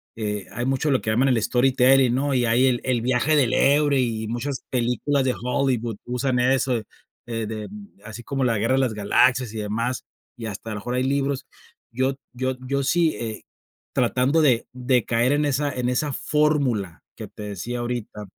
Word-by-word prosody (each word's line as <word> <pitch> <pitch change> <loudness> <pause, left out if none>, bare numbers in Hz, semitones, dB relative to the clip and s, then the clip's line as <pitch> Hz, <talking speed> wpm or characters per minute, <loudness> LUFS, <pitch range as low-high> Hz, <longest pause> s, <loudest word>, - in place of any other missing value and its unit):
eh, 105 -3 -3
hay 120 +4 -3
mucho 135 +2 +1
lo 130 - +2
que 110 - -3
llaman 130 +5 +3
el 120 -4 +2
storytelling, 130 +1 +4
¿no? 140 +2 0
Y 125 -2 +2
hay 120 +3 +3
el 120 -2 +1
el 125 -3 0
viaje 130 +5 +2
del 130 -3 +2
héroe 145 0 +3
y 110 -3 -2
muchas 120 +4 -4
películas 125 +3 0
de 125 - +1
Hollywood 125 -3 0
usan 125 +1 -1
eso, 125 -2 +2 0.4
eh, 115 -2 -3
de 110 -1 -5 0.4
así 110 +2 -8
como 135 +1 -2
la 115 -3 +2
Guerra 115 +5 +1
de - - +2
las 125 -4 0
Galaxias 125 +3 +2
y - - -6
demás, 115 +4 -2 0.3
y 115 -2 -5
hasta 110 +2 -6
a - - -3
lo 105 - -4
mejor 125 +3 -3
hay 125 - +1
libros. 140 0 -1 0.5
Yo 130 +2 0 0.2
yo 130 +1 -2
yo 140 0 0
sí, 165 +2 +2
eh, 110 -2 -5 0.5
tratando 135 +6 +2
de 125 -6 +3
de 125 -1 +1
caer 120 +3 +2
en 150 0 +1
esa 145 +1 0
en 125 -1 -2
esa 145 +3 0
fórmula 140 - 0
que - - -8
te 105 - -10
decía 105 +4 -5
ahorita 120 -3 -4
125 Hz, 190 wpm, -23 LUFS, 115-135 Hz, 0.5 s, storytelling